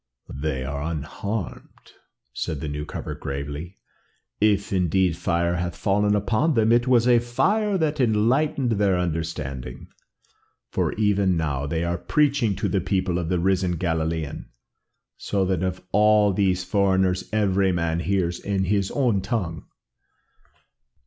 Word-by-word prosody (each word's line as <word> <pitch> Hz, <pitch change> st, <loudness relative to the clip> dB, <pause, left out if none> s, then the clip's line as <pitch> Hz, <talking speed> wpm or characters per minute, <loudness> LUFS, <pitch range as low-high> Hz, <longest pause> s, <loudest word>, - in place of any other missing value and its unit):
"They 70 Hz, -1 st, -3 dB
are 70 Hz, +1 st, -4 dB
unharmed," 85 Hz, +6 st, -5 dB, 0.4 s
said 75 Hz, +4 st, -3 dB
the 75 Hz, -, -5 dB
newcomer 75 Hz, +1 st, -5 dB
gravely. 70 Hz, +6 st, -6 dB, 0.6 s
"If, 100 Hz, -1 st, +2 dB
indeed, 90 Hz, -1 st, +2 dB
fire 85 Hz, 0 st, 0 dB
hath 85 Hz, 0 st, -3 dB
fallen 105 Hz, +3 st, +2 dB
upon 110 Hz, +9 st, +1 dB
them, 110 Hz, -1 st, +3 dB
it 120 Hz, +1 st, +3 dB
was 125 Hz, -2 st, +4 dB
a 120 Hz, -1 st, +6 dB
fire 200 Hz, -, +1 dB
that 155 Hz, -3 st, -1 dB
enlightened 125 Hz, +4 st, +2 dB
their 100 Hz, -4 st, +2 dB
understanding, 75 Hz, -7 st, -4 dB, 0.8 s
for -, -, 0 dB
even 100 Hz, -4 st, +2 dB
now 70 Hz, -3 st, -2 dB
they 80 Hz, +2 st, -1 dB
are 85 Hz, 0 st, -1 dB
preaching 135 Hz, +1 st, +1 dB
to -, -, -1 dB
the 95 Hz, -, 0 dB
people 95 Hz, -2 st, 0 dB
of 85 Hz, -2 st, -3 dB
the 90 Hz, -, +1 dB
risen 90 Hz, 0 st, +1 dB
Galilean, 80 Hz, -3 st, -2 dB, 0.7 s
so 100 Hz, -2 st, -1 dB
that 95 Hz, -2 st, 0 dB
of 95 Hz, 0 st, -3 dB
all 105 Hz, -1 st, +4 dB
these 95 Hz, -2 st, +1 dB
foreigners 95 Hz, -2 st, +1 dB
every 100 Hz, -3 st, +2 dB
man 85 Hz, -1 st, -1 dB
hears 90 Hz, -1 st, -1 dB
in 100 Hz, -1 st, -1 dB
his 95 Hz, +1 st, 0 dB
own 120 Hz, -8 st, +1 dB
tongue." 90 Hz, -, -3 dB
95 Hz, 135 wpm, -24 LUFS, 85-105 Hz, 0.8 s, a